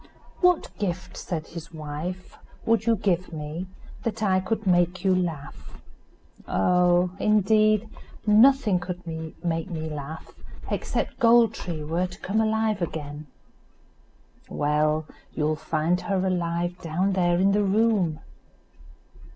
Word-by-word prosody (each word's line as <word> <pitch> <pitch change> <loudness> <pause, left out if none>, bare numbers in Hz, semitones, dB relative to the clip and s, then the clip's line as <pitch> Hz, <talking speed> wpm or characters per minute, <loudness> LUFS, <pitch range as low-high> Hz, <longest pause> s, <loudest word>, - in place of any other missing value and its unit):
"What 360 -2 +2
gift," 185 -3 -3
said 160 -3 -4
his 165 -1 -9
wife, 160 +4 -6 0.3
"would 225 0 +2
you 230 - +5
give 185 -3 0
me 155 +3 -5 0.3
that 220 -1 -3
I 190 -2 +3
could 215 +3 -3
make 180 0 +2
you 190 - +4
laugh?" 170 -6 -4 0.7
"Oh! 180 - +3
indeed, 215 +1 +3 0.4
nothing 220 -2 +5
could 180 0 -6 0.4
make 165 +1 -1
me 160 -2 -4
laugh, 150 +2 -7 0.4
except - - -2
Gold 235 -1 +5
tree 165 -4 -5
were 170 +4 -1
to 180 - -12
come 215 +3 0
alive 220 -2 +1
again." 150 -2 -5 1.2
"Well, 150 +1 +1 0.3
you'll 155 0 +1
find 160 +3 0
her 190 -2 -1
alive 175 -1 -1
down 180 +4 0
there 175 -2 +2
in 195 +1 +4
the 205 +1 +2
room." 200 -5 +2
180 Hz, 125 wpm, -25 LUFS, 160-205 Hz, 1.2 s, you